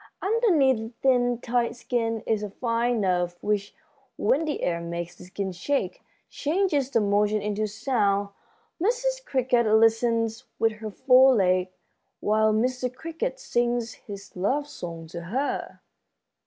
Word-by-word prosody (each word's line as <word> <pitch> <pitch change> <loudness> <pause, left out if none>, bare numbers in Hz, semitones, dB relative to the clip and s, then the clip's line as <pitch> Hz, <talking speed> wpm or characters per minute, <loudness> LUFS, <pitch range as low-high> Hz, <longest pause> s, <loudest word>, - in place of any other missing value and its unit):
"Underneath 380 - +3
the 225 +1 -6
thin, 245 -2 +3
tight 240 -1 0
skin 230 -2 -2
is 220 -2 0
a 210 - -4
fine 235 +1 0
nerve 175 -2 0
which, 205 -1 -1 0.4
when 275 +9 +2
the 300 - -3
air 170 -1 0
makes 170 0 -5
the 180 - -13
skin 190 +1 -4
shake, 285 - -2 0.3
changes 300 -4 0
the 235 - +2
motion 210 0 +2
into 210 +1 -1
sound. 205 -3 0 0.5
Mrs. - - 0
Cricket 250 - +1
listens 225 +2 +2
with 225 0 +2
her 215 0 -7
fore 260 +3 +5
leg 185 -2 +2 0.5
while 215 +1 +2
Mr. 250 +3 0
Cricket 330 - -4
sings 240 - -1
his 200 -1 -11
love 265 +11 0
song 170 - -7
to 170 +2 -7
her." 260 +10 -3
230 Hz, 140 wpm, -26 LUFS, 205-260 Hz, 0.5 s, fore